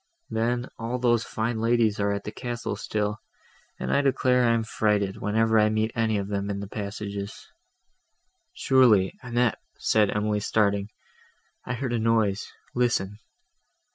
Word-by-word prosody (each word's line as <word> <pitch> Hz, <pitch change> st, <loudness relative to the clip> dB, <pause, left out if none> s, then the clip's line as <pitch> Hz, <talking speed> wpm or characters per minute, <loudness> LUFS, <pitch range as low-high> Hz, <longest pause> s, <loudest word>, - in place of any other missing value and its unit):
Then, 120 Hz, +2 st, 0 dB
all 115 Hz, +2 st, -2 dB
those 120 Hz, -2 st, +2 dB
fine 110 Hz, +1 st, -2 dB
ladies 115 Hz, -2 st, +2 dB
are 100 Hz, 0 st, +1 dB
at 100 Hz, 0 st, -3 dB
the 105 Hz, -, -5 dB
castle 120 Hz, +1 st, -4 dB
still; 105 Hz, 0 st, -2 dB, 0.6 s
and -, -, -2 dB
I 140 Hz, -, +4 dB
declare 130 Hz, -2 st, +2 dB
I 115 Hz, -, +4 dB
am 115 Hz, -, 0 dB
frighted, 105 Hz, -3 st, 0 dB
whenever 110 Hz, +1 st, +2 dB
I 105 Hz, 0 st, +4 dB
meet 110 Hz, +1 st, 0 dB
any 110 Hz, -2 st, +1 dB
of 100 Hz, -1 st, -3 dB
them 100 Hz, 0 st, -2 dB
in 100 Hz, -1 st, -2 dB
the 100 Hz, -, -5 dB
passages—" 100 Hz, -1 st, -6 dB, 1.1 s
"Surely, 115 Hz, -8 st, +4 dB
Annette," 120 Hz, -2 st, 0 dB, 0.2 s
said 105 Hz, -2 st, +2 dB
Emily 105 Hz, 0 st, 0 dB
starting, 100 Hz, -1 st, +1 dB, 0.8 s
"I 125 Hz, -, -1 dB
heard 125 Hz, -1 st, -3 dB
a 120 Hz, -, +1 dB
noise: 110 Hz, -2 st, +1 dB, 0.2 s
listen." 110 Hz, -5 st, 0 dB
110 Hz, 150 wpm, -26 LUFS, 105-120 Hz, 1.1 s, I